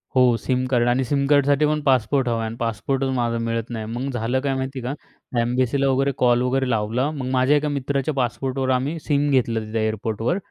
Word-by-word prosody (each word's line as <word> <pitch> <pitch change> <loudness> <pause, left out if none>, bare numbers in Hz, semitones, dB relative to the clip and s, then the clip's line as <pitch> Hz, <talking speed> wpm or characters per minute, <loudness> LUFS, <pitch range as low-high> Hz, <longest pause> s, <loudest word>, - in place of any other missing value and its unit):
हो, 125 -2 +5
SIM 130 +1 -1
card. 120 -1 +3
आणि 125 +2 +2
SIM 140 +2 0
कार्डसाठीपण 145 +1 +3
passport 130 -1 +2
हवा 115 -1 +1
आहे. 115 - -2
आणि 110 - -6
पासपोर्टच 120 +4 -1
माझा 120 -1 0
मिळत 115 0 -2
नाही. 110 -2 -4
मग 130 +3 -3
झालं 120 +1 -1
काय 140 -1 0
माहिती 130 0 -4
का, 125 +3 -3 0.5
एम्बेसीला 130 +3 +1
वगैरे 135 +1 +2
कॉल 120 -1 +3
वगैरे 130 +1 0
लावला. 115 +5 0
मग 135 -4 -4
माझ्या 130 +3 +3
एका 150 +1 -1
मित्राच्या 140 +1 -1
पासपोर्टवर 130 +1 -1
आम्ही 140 +6 -2
सिम 145 -1 +2
घेतलं 115 -5 +1
तिथे 110 0 -1
एअरपोर्टवर, 110 - -1
130 Hz, 195 wpm, -22 LUFS, 120-140 Hz, 0.5 s, हो